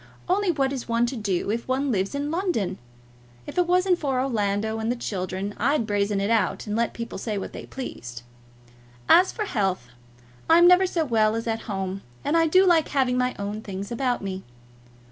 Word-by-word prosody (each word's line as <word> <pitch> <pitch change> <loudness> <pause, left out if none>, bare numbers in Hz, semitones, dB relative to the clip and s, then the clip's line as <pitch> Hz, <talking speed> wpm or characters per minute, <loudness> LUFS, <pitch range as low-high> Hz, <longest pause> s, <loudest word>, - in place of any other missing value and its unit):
Only 385 +2 +1
what 275 -5 +1
is 255 -3 -6
one 230 +1 +2
to 250 +3 -3
do 200 -3 -1
if 230 +1 -3
one 265 +1 0
lives 195 +3 -1
in 290 +1 -2
London? 325 - -1 0.7
If - - -3
it 355 - +2
wasn't 360 0 +3
for 270 -4 0
Orlando 220 -3 -1
and 220 +1 -1
the - - -1
children, 195 -3 -4
I'd 270 +1 +2
brazen 205 -1 0
it 200 +3 0
out, 220 -5 +1
and 210 -1 -3
let 235 +1 0
people 230 -4 -6
say 210 0 -3
what 195 - -5
they - - -8
pleased. 120 - -7 0.8
As 365 +2 +6
for 430 - -3
health, 190 - -1 0.6
I'm 340 +2 +7
never 360 +1 +6
so 335 -3 -1
well 220 -4 +2
as 230 - -3
at 225 -1 -2
home, 195 -1 -3 0.2
and 290 - +1
I 330 0 +4
do 370 +4 +5
like 340 -4 +4
having 260 -3 +1
my 250 0 0
own 205 +2 -4
things 200 0 -6
about 245 -2 -1
me. 190 -1 -4
235 Hz, 200 wpm, -25 LUFS, 200-290 Hz, 0.8 s, I'm